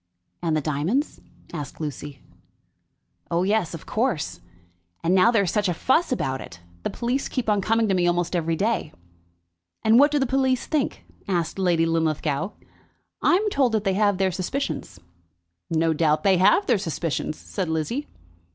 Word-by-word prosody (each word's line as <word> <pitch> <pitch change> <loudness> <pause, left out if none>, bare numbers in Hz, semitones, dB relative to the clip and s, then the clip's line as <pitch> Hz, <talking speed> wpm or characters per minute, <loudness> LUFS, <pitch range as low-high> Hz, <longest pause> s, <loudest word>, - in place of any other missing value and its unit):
"And 165 -3 +1
the - - 0
diamonds?" 160 - -1 0.3
asked 145 -5 -6
Lucy. 145 -2 -6 1.1
"Oh 170 +1 +1
yes; 190 -4 +1
of 160 - -10
course. 215 - -1 0.6
And 170 - +2
now 190 +4 +6
there 225 -4 +3
is 180 - -1
such 205 -2 +1
a 175 - -1
fuss 280 - +2
about 135 - -1
it! 90 - -10 0.2
The - - -2
police 250 +3 -2
keep 255 -4 -3
on 205 -2 +2
coming 225 +2 +2
to 195 - +1
me 180 -2 +2
almost 175 +1 0
every 165 -1 0
day." 205 -4 -1 0.9
"And 220 +2 +6
what 290 +2 +6
do 295 - 0
the 270 - +2
police 260 -1 +1
think?" 300 -4 -2 0.2
asked 175 -1 -1
Lady 175 -3 +2
Linlithgow. 160 0 0 0.7
"I'm 395 +5 +3
told 265 -7 +2
that 215 -2 +1
they 195 -2 +1
have 205 -1 +2
their 190 0 +1
suspicions." 185 - -4 0.7
"No 165 0 +2
doubt 155 +1 +2
they 195 -2 +4
have 190 - +4
their 225 - +2
suspicions," 160 -2 -3
said 185 -5 -4
Lizzie. 160 - -2
185 Hz, 170 wpm, -24 LUFS, 160-230 Hz, 1.1 s, now